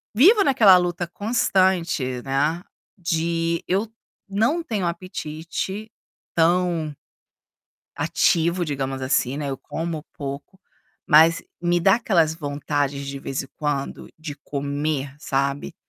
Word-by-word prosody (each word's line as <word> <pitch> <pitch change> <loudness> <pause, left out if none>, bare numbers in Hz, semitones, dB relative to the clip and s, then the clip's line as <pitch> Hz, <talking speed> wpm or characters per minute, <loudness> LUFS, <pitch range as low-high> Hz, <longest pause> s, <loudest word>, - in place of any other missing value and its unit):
vivo 400 - +7
naquela 220 - +7
luta 175 -1 -1
constante, 185 - +1
né, 145 +5 0 0.4
de 170 -1 -1
eu 195 +5 +1 0.4
não 225 - +1
tenho 215 - -2
apetite 180 +4 -5 0.4
tão 170 -2 +1 1.0
ativo, 170 +2 +2
digamos 135 -3 -3
assim, 130 0 +1
né, 145 -2 -3
eu 135 - -3
como 160 -2 -4
pouco, 140 +6 -7 0.5
mas 160 +3 +6 0.2
me 175 0 +2
dá 190 +3 +5
aquelas 175 -9 +2
vontades 145 -2 -2
de 140 0 -5
vez 135 0 -3
em - - -12
quando 145 -3 -3
de 155 -2 -7
comer, 145 0 -3
sabe. 140 -1 -2
165 Hz, 115 wpm, -23 LUFS, 145-185 Hz, 1.0 s, vivo